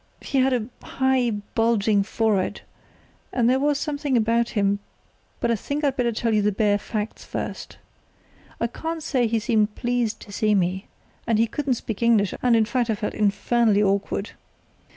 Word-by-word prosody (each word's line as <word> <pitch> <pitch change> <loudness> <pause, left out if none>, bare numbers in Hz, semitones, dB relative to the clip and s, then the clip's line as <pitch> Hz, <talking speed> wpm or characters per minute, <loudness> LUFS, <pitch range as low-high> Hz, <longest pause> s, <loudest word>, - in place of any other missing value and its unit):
He 275 - -1
had 265 +1 +3
a 240 -4 0 0.2
high, 265 -2 +1 0.2
bulging 220 -3 +2
forehead, 210 -2 0 0.7
and 235 -2 +2
there 260 +2 +3
was 290 +1 +2
something 290 -3 -1
about 230 +1 +2
him—but 200 +3 -3
I - - +3
think 285 +8 -4
I'd 275 -2 +1
better 240 -2 +1
tell 230 0 -1
you 210 - +3
the 210 +1 +2
bare 205 0 +2
facts 210 +1 -4
first. - - -6 0.8
I - - +1
can't 320 +7 -4
say 255 -7 +1
he 225 +1 0
seemed 215 -2 +1
pleased 240 -2 -1
to 205 - -11
see 210 +1 +1
me, 190 +1 0 0.4
and 225 -2 +2
he 225 - +4
couldn't 270 +2 -1
speak 225 -2 -6
English, 225 -4 +3
and, 245 -2 +4
in 225 -1 +4
fact, 245 +1 -1
I 220 - +2
felt 210 - -3
infernally 210 +1 +2
awkward. 200 +1 -1
230 Hz, 170 wpm, -24 LUFS, 210-250 Hz, 0.8 s, he